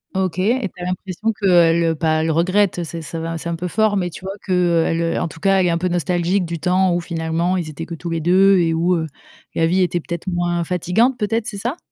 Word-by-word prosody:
OK 190 -2 -1
et 220 +2 +1
tu - - -12
as - - -4
l'impression 185 +4 -2
qu'elle, 175 -5 +4
heu, 165 -1 +1
pas 155 0 +1
elle 160 - +1
regrette, 185 +4 +2
heu, - - -2
c'est 165 +1 -6
ça 165 +1 -6
va 165 0 -4
c'est 170 - -5
un 170 - -2
peu 175 +2 -4
fort, 210 +3 +1
mais 180 -2 -1
tu 175 - -11
vois? 195 - -4
Qu'elle, 170 -3 +1
heu, 165 0 0
en 175 - -1
tout 165 - -12
cas, 195 +3 +3
elle 180 - +2
est - - +2
un 170 - +1
peu 180 +2 -1
nostalgique 175 +2 0
du 170 0 -5
temps 180 +2 +2
où 175 - -1
finalement 165 +1 -1
ils 170 -3 -3
étaient 155 +2 -6
que 170 - -8
tous 170 +2 -6
les 165 -1 -2
2 190 +4 +5
et 165 -2 +2
où, 170 +3 +2
heu, 160 -1 -2 0.5
la 165 - +2
vie 185 +3 +2
était 175 -1 +1
peut-être 170 +2 -6
moins 175 -1 0
fatigante, 180 +9 +1
peut-être, 215 +1 -1
c'est 220 -3 -5
ça? 245 - -3
175 Hz, 265 wpm, -20 LUFS, 165-190 Hz, 0.5 s, 2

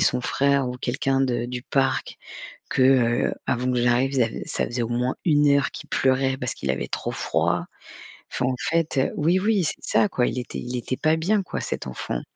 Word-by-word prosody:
son 125 - +2
frère 140 0 +1
ou 125 - -5
quelqu'un 135 +2 0
de 125 -3 0
du 125 0 -5
parc 135 0 0 0.6
que, 135 - +1
heu, 125 -3 +3
avant 125 0 0
que 125 - +1
j'arrive, 125 +3 +2
zav 115 -4 +2
ça - - -1
faisait 120 0 -3
au 115 - -4
moins 125 +2 0
1 150 -3 +4
heure 140 - +2
qu'il - - -9
pleurait 130 0 +2
parce 125 -1 -3
qu'il 70 -1 -2
avait 60 -1 -3
trop - - -3
froid. - - 0 0.7
Enfin, 125 - -1
en 130 0 0
fait, 165 -2 0
heu 130 - +2
oui, 170 +5 +3
oui, 205 -1 +2
c'est - - -4
ça, - - +3
quoi. 125 - +1
Il - - -2
était 125 - -6
il 125 0 -4
était 130 +2 -3
pas 155 0 +2
bien, 195 +5 +1
quoi, - - -5
cet - - -4
enfant. 60 -1 -4
130 Hz, 215 wpm, -24 LUFS, 125-140 Hz, 0.7 s, 1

